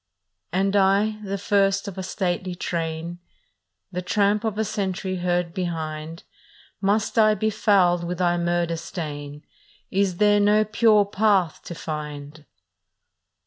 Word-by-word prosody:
" 90 - -56
And 195 +3 +1
I, 200 +2 +3
the 200 0 -3
first 195 0 +1
of 200 - -6
a 190 - -4
stately 185 -1 -2
train, 170 0 -4 0.7
The 180 0 -3
tramp 205 +3 +1
of 220 -2 -2
a 220 - 0
century 190 -3 -2
heard 175 -1 -1
behind, 160 -2 -4 0.6
Must 210 +3 +1
I 215 -1 +5
be 215 +2 0
fouled 180 -5 +3
with 175 +1 -3
thy 175 -1 +2
murder 170 -1 0
stain? 150 -4 -7 0.5
Is 190 -2 +1
there 205 0 +4
no 210 +1 +4
pure 215 -1 +4
path 200 -4 +1
to 170 - -7
find? 150 -1 -7
185 Hz, 140 wpm, -24 LUFS, 170-205 Hz, 0.7 s, I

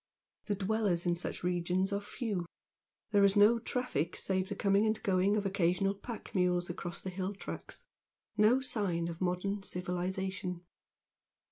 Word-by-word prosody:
The 205 - +1
dwellers 200 -3 0
in 175 - +3
such 170 +1 -3
regions 180 +2 +1
are 200 - 0
few 205 -5 -3 0.6
there 205 -2 +5
is 200 +1 +5
no 215 +3 +6
traffic 230 - -1
save 190 0 -1
the 205 - -3
coming 200 +2 +3
and 215 0 +1
going 195 +2 +3
of 205 - -1
occasional 195 0 +2
pack 215 +3 -8
mules 180 -2 +2
across 175 0 -5
the 190 - -5
hill 190 +2 -3
tracks - - -8 0.5
no 220 +5 +5
sign 185 -10 -1
of 165 +1 -7
modern 185 +3 0
civilisation. 180 0 -3
190 Hz, 150 wpm, -33 LUFS, 180-205 Hz, 0.6 s, no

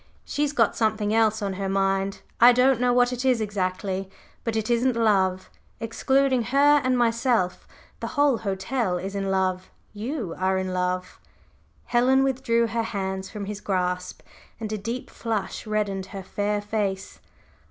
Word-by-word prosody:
She's 290 -1 -1
got 230 -7 +2
something 215 -1 0
else 220 -1 +2
on 195 -1 -1
her 195 - -1
mind 195 0 0 0.2
I 245 +1 +8
don't 250 0 +3
know 250 0 +3
what 245 0 +3
it 250 +1 -3
is 255 -3 +3
exactly, 195 -2 -2 0.3
but 230 -1 -2
it 220 -1 -1
isn't 245 +1 +2
love. 190 -5 +1 0.3
Excluding 260 +3 +1
her 285 +3 +4
and 255 0 +2
myself, 230 -5 +1 0.3
the - - -4
whole 285 -5 +4
hotel 195 0 -1
is 190 +2 -5
in 195 -1 -2
love 185 -1 0 0.2
you 220 - -4
are 190 0 +1
in 185 -1 -2
love!" 180 0 -2 0.7
Helen 255 +2 +3
withdrew 250 -3 +1
her 230 0 -1
hands 190 -3 -3
from 210 -2 -6
his 205 0 -6
grasp 180 -2 -2 0.4
and 215 -1 -4
a - - -1
deep 230 +5 -5
flush 225 -1 -3
reddened 200 -3 -1
her 195 0 -7
fair 205 +2 -1
face. 205 -2 -3
215 Hz, 160 wpm, -25 LUFS, 190-245 Hz, 0.7 s, I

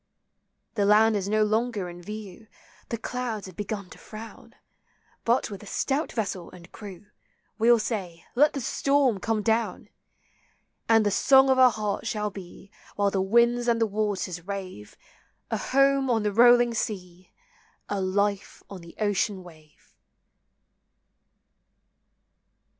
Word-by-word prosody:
The 210 - 0
land 215 +2 +5
is 200 -1 -2
no 215 0 +3
longer 215 -2 -1
in 175 0 -10
view, 210 +2 -9 0.4
The 230 - -2
clouds 230 -2 -4
have 185 -2 -11
begun 200 -1 -5
to - - -13
frown; 220 +1 -11 0.7
But 235 -1 +1
with 200 - -8
a 210 - -12
stout 280 +9 -1
vessel 195 -6 -3
and 175 -1 -15
crew, 205 0 -11 0.5
We 225 - +2
'11 240 -1 +6
say, 185 -8 -5
Let 290 +4 +4
the 275 - -4
storm 275 -3 +1
come 215 +2 -1
down! 225 +1 -1 1.0
And 225 -1 +5
the 205 - +2
song 265 +5 +5
of 260 - +3
our 255 -1 +8
hearts 210 -1 -3
shall 210 -1 -2
be, 195 +1 -12 0.2
While 200 -1 +1
the 195 - 0
winds 235 +4 +2
and 235 -1 +2
the 225 - +3
waters 200 -4 -2
rave, 185 - -7 0.5
A - - 0
home 275 0 +2
on 225 -3 +1
the 210 -1 -1
rolling 240 +1 +6
sea! 185 -5 -5 0.6
A 205 -1 -2
life 200 +1 -1
on 190 -3 -8
the 170 0 -14
ocean 205 -2 0
wave 155 -3 -18
210 Hz, 145 wpm, -26 LUFS, 195-235 Hz, 1.0 s, our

